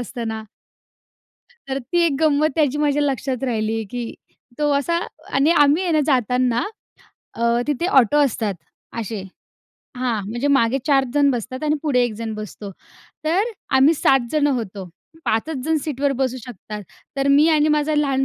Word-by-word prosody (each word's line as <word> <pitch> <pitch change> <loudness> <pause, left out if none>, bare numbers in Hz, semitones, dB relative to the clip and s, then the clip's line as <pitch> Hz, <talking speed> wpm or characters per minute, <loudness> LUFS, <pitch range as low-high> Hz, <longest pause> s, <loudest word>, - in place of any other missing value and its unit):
असतं 240 -1 -5
ना. 220 0 -5 1.2
तर 270 0 -1
ती 275 +7 -1
एक 315 - +1
गंमत 305 0 +3
त्याची 295 -3 +1
माझ्या 295 -1 +2
लक्षात 265 -2 -2
राहिली, 225 -2 -1
की 240 -2 -5 0.4
तो 295 -1 +1
असा 310 +5 +1 0.4
आणि 275 +4 +4
आम्ही 300 +1 +4
आहे 350 - 0
ना 310 - +3
जाताना, 250 -2 +2 0.7
अ, 230 - -5 0.2
तिथे 295 +4 -1
ऑटो 245 +4 +1
असतात 220 -6 -1 0.5
असे. 215 -2 -5 0.7
हां, 245 -4 -1
म्हणजे 240 +6 -2
मागे 270 -2 +3
4 275 -2 +4
जण 285 -1 +4
बसतात 255 +2 -4
आणि 300 0 +2
पुढे 265 -5 +2
1 240 - -2
जण 225 0 -5
बसतो. 210 -1 -7 0.5
तर 380 +9 +1 0.3
आम्ही 275 +5 +5
7 270 -4 +2
जण 300 -1 +2
होतो. 210 -8 -3 0.4
5 220 0 +1
च - - -2
जण 320 +1 +1
सीटवर 285 -2 0
बसू 260 -1 -1
शकतात. 210 -3 -8 0.3
तर, 275 0 +1
मी 290 +3 +5
आणि 310 -1 +3
माझा 300 0 +1
लहान 275 -3 +1
270 Hz, 165 wpm, -21 LUFS, 235-295 Hz, 1.2 s, आम्ही